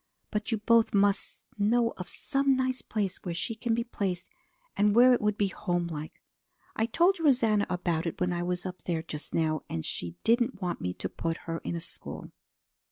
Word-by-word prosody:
But 210 +2 -2
you 225 - +2
both 230 +1 +3
must 200 0 +1
know 230 +3 +3
of 180 - -7
some 275 0 +1
nice 255 0 0
place 200 -4 -2
where 175 -3 -3
she 225 +7 -2
can 225 +1 -1
be 235 - 0
placed 190 -6 -3 0.4
and 205 +1 +3
where 250 +2 +8
it 245 - +2
would 210 0 +1
be 200 -1 +2
homelike. 170 -5 -3 0.5
I 225 - +1
told 345 +9 +3
Rosanna 235 -9 +3
about 175 -2 -1
it 165 - -4
when 180 0 +1
I 175 - -1
was 180 +1 -2
up 185 -1 -6
there 165 -2 -1
just 150 -3 -5
now, 155 -2 +1
and 80 - -3
she 85 -1 -3
didn't 235 0 +2
want 180 -3 -3
me 90 0 -2
to - - -3
put 165 0 -3
her 165 0 -3
in - - -4
a - - -2
school. 165 - -6
200 Hz, 200 wpm, -29 LUFS, 175-230 Hz, 0.5 s, where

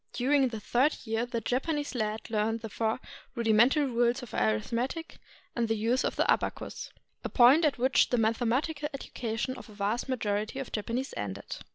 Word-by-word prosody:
During 270 +2 +3
the 225 -3 -5
third 255 +8 +2
year, 225 +1 -1
the 235 -1 -3
Japanese 290 +6 -1
lad 220 -2 -2
learned 220 +1 0
the 225 - -6
four 220 +3 -1 0.4
rudimental 235 +5 +4
rules 245 0 +1
of 245 - -10
arithmetic 230 - -1 0.4
and 235 -1 +1
the 225 - +1
use 230 +4 +1
of - - -1
the - - +2
abacus, - - -1 0.3
a - - -3
point 260 +6 +6
at 295 - +1
which 255 +2 +3
the 245 - +1
mathematical 250 +7 0
education 240 -1 -4
of - - -11
the 215 - -13
vast 210 +6 -2
majority 215 -2 -1
of 270 -2 -5
Japanese 230 +5 -3
ended. 100 0 -5
235 Hz, 175 wpm, -29 LUFS, 220-265 Hz, 0.4 s, point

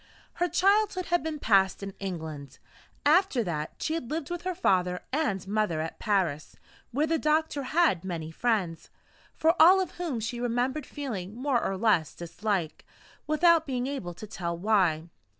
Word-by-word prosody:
Her 355 - +2
childhood 395 +1 +2
had 350 +1 +1
been 315 -1 -4
passed 195 -6 +2
in 195 0 -5
England. 160 -7 -6 0.5
After 305 -5 +4
that, 155 -5 -4
she 315 - -2
had 285 -8 -4
lived 310 0 -4
with 350 -1 -3
her 370 0 -3
father 180 - +1
and 210 - -1
mother 205 -6 0
at 160 +1 -5
Paris, 180 -8 -1 0.3
where 290 +5 0
the 320 0 0
doctor 305 -1 +1
had 275 - +2
many 165 -4 -5
friends 190 -5 -1 0.5
for 320 +1 +3
all 365 +4 +8
of 375 - -2
whom 305 -9 -2
she 235 +2 -4
remembered 245 +4 -1
feeling 220 -9 -5
more 255 -1 0
or 195 - -1
less 190 -7 +2
dislike, 175 -1 -3 0.4
without 320 +1 +4
being 250 -2 -1
able 260 -11 -4
to 215 - -8
tell 170 -5 -4
why. 175 -5 +2
230 Hz, 165 wpm, -28 LUFS, -, 0.5 s, all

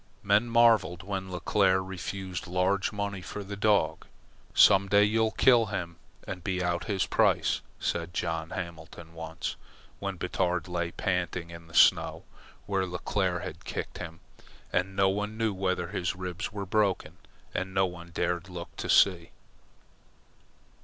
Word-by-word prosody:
Men 105 +4 +3
marvelled 115 -7 +4
when 95 -1 -4
Leclere 95 +1 +2
refused 95 0 -5
large 90 +2 +1
money 100 -2 -3
for 105 +3 -6
the 100 +1 -6
dog. 105 0 +1 0.5
"Some 100 -1 +6
day 100 +1 +6
you'll 110 +2 +2
kill 120 0 +4
him 85 -4 -4 0.3
and 90 -2 -6
be 90 -1 -1
out 85 0 -1
his 100 -4 0
price," - - +2 0.2
said 85 0 -2
John 80 -1 -2
Hamlin 85 -3 -7
once, 80 0 -5 0.4
when 100 -2 -4
Batard 90 0 -1
lay 85 -1 -2
panting 90 -1 -2
in 85 -1 -11
the 80 - -13
snow - - +5 0.4
where 95 -2 0
Leclere 90 0 -1
had - - -7
kicked - - -5
him, 85 0 -8 0.5
and 95 +1 0
no 95 0 +4
one 105 +3 -2
knew 110 -2 +1
whether 95 -2 -1
his 90 +1 -2
ribs 90 +5 -4
were 100 -2 -4
broken, 95 -5 0 0.4
and 95 0 -2
no 95 0 +3
one 85 -1 -8
dared 85 +2 -2
look 85 -1 -8
to - - -4
see. 85 -4 +4
95 Hz, 150 wpm, -29 LUFS, 85-100 Hz, 0.5 s, Some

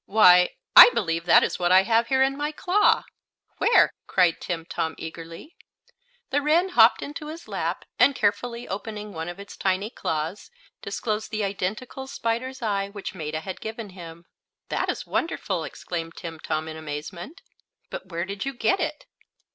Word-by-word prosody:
Why, 180 -4 +6 0.2
I - - +12
believe 165 -7 -1
that 170 - +7
is - - -2
what 175 0 +1
I 190 +1 +7
have 230 +2 +2
here 265 +1 +3
in 270 +1 +1
my 295 +1 -2
claw!" 375 +6 +2 0.6
"Where?" 470 - +5
cried 180 -3 +2
Timtom, 165 -2 -3
eagerly. 165 - -9 0.8
The 290 +2 +2
wren 325 +6 +2
hopped 230 -8 +5
into 295 +1 -7
his 320 -1 -9
lap, 180 -4 -3
and 260 +3 +5
carefully 235 +3 -1
opening 210 +1 -6
one 160 +1 -5
of 175 - -8
its 200 - -10
tiny 195 +3 -1
claws 160 -1 -4 0.3
disclosed 215 -2 -3
the 215 -1 -2
identical 210 +7 -4
spider's 255 0 -3
eye 200 -2 -1
which 200 -2 -7
Maetta 155 -3 -4
had 190 +1 -7
given 220 -1 -6
him. 170 -2 -11 0.4
"That - - -1
is - - -3
wonderful!" 190 - -2
exclaimed 165 0 -6
Timtom, 160 -1 -4
in 160 0 -7
amazement. 160 - -7 0.5
"But 185 - -7
where 170 -1 -3
did 195 +1 -5
you 275 0 -3
get 380 +10 +1
it?" 310 -3 -3
200 Hz, 165 wpm, -25 LUFS, 170-245 Hz, 0.8 s, I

